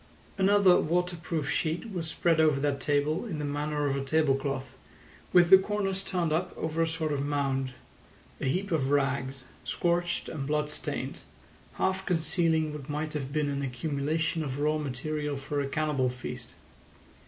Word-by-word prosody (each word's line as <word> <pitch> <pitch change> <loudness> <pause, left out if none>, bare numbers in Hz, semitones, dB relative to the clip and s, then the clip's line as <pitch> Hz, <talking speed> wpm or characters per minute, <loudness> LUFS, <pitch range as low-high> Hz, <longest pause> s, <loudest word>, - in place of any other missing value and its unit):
Another 195 -1 +6
waterproof 170 -2 -1
sheet 165 +7 -1
was 170 -4 -3
spread 165 0 +1
over 155 -3 +4
that 140 -1 0
table 145 +2 +1
in 170 -8 -4
the 150 - -3
manner 145 +1 -1
of 135 - 0
a 140 - -2
table 155 0 +3
cloth, 135 -2 -3 0.6
with 175 0 +5
the 190 - +11
corners 195 -1 -1
turned 175 -5 0
up 170 +3 0
over 160 +1 -1
a 165 - +3
sort 160 -2 -1
of 140 -1 -1
mound—a 135 -4 -4
heap 185 +8 -1
of 140 -5 +1
rags, 135 -2 0 0.2
scorched 175 0 0
and 140 -3 -4
bloodstained, 150 0 -2 0.5
half 190 0 0
concealing 160 -2 +1
what 150 -2 -8
might 150 +1 -2
have 140 -3 -3
been 150 0 0
an 140 0 -2
accumulation 150 +4 -1
of 135 -1 -4
raw 150 +1 +1
material 150 +1 -3
for 145 +1 -2
a 140 - -2
cannibal 145 -3 +1
feast. 125 0 -7
150 Hz, 160 wpm, -29 LUFS, 140-165 Hz, 0.6 s, the